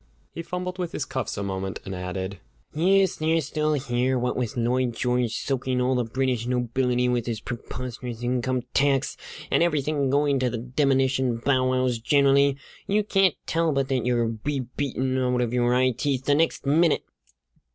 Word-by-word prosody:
He 165 - -6
fumbled 180 +2 -5
with 175 -2 -3
his 140 - -2
cuffs 130 -7 -4
a 100 - -2
moment, 95 0 -4
and 95 - -5
added: 95 +1 -4 0.3
"Yes, 190 +4 +3
they're 160 +1 +2
still 155 +1 -1
here. 130 -2 0
What 125 0 -1
with 125 -1 -3
Lloyd 120 0 0
George 125 -2 0
soaking 130 -1 -1
all 125 +1 +2
the 125 -1 +1
British 125 0 -1
nobility 125 0 +1
with 125 -1 0
his 115 -2 -2
preposterous 120 0 -6
income 125 0 0
tax, 140 -1 +2 0.4
and - - +3
everything 150 -4 +1
going 140 0 +2
to 130 -1 +1
the 120 - -3
demnition 130 0 +1
bow 130 +1 +1
wows 130 -2 +1
generally, 140 +2 +3 0.3
you 210 +2 +2
can't 195 -4 +3
tell 165 0 +1
but 135 -1 0
that 130 -3 0
you'll 115 -2 0
be 145 -2 -1
beaten 130 -2 -1
out 125 -1 +1
of 120 -1 -1
your 120 -1 +2
eye 130 0 +3
teeth 130 +2 -2
the 145 - +3
next 160 -1 +1
minute!" 155 +3 +3
130 Hz, 175 wpm, -25 LUFS, 120-145 Hz, 0.4 s, Yes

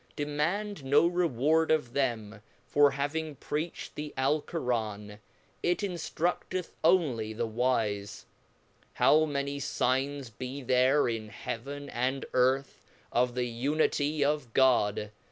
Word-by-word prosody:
Demand 155 +6 -2
no 145 +4 +4
reward 160 -2 +2
of 150 -7 +1
them 115 -6 -2 0.2
for 145 0 +5
having 145 +2 -3
preached 155 +5 -4
the 150 0 -6
Alceran, 120 -8 -1 0.4
it 175 0 +1
inftrudeth 180 -1 -2
onely 145 -11 +2
the 115 +2 -2
wife. 110 -4 -1 0.7
How 155 +1 +5
many 140 -1 -2
fignes 135 -1 -1
be 130 +2 -6
there 130 +3 +3
in 110 -2 -3
Heaven 140 +5 -6
and 130 +2 -1
Earth, 130 +2 +1 0.3
of 125 0 +1
the 125 -1 0
unity 145 +4 0
of 145 -5 -1
God 105 -5 +3
140 Hz, 115 wpm, -29 LUFS, 120-150 Hz, 0.7 s, for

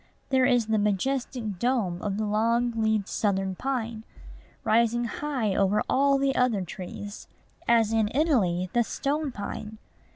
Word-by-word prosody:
There 260 -1 +4
is 245 -3 +3
the 220 0 +1
majestic 215 0 -1
dome 215 -8 0
of 200 -1 -2
the 215 - -1
long 230 +3 +1
leaved 220 -2 +1
Southern 195 -2 0
pine, 230 -1 -3 0.6
rising 235 +1 +2
high 240 -3 -2
over 200 +2 +2
all 275 +1 +3
the 275 0 +1
other 235 -6 +2
trees, 195 +3 -8 0.4
as 225 -2 +4
in 220 -2 +2
Italy 195 - +1
the 240 - +3
stone 285 +4 -2
pine. 210 0 -6
225 Hz, 140 wpm, -27 LUFS, 205-250 Hz, 0.6 s, There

